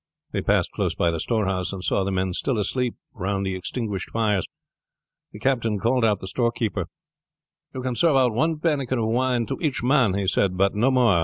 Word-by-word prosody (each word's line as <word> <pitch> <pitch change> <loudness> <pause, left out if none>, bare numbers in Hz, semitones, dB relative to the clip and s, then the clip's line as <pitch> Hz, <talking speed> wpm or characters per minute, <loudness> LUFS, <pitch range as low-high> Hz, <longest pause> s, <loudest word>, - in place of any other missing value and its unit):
They - - -1
passed - - +1
close - - -1
by 85 - +2
the 80 - -3
storehouse, 95 -3 -1
and 95 -2 -6
saw 100 - +1
the 100 - -1
men 95 -1 -1
still 125 +6 -1
asleep 120 +4 -1 0.2
round 100 0 -2
the 95 - -1
extinguished 100 +2 -4
fires. 105 -5 0 0.8
The - - -10
captain 115 -2 0
called 120 +4 +1
out 105 -3 +2
the 95 - -6
storekeeper: 115 -5 -1 0.9
"You 130 - -4
can 130 -1 -2
serve 165 +2 +3
out 130 -3 +3
one 160 +7 +1
pannikin 145 -5 0
of 110 -1 0
wine 125 0 +1
to - - -4
each 145 -7 0
man," 125 -7 +3
he 100 -1 -1
said, 95 0 +1
"but 100 +1 +3
no 115 +6 +2
more. 120 -9 +4
110 Hz, 205 wpm, -24 LUFS, 95-125 Hz, 0.9 s, more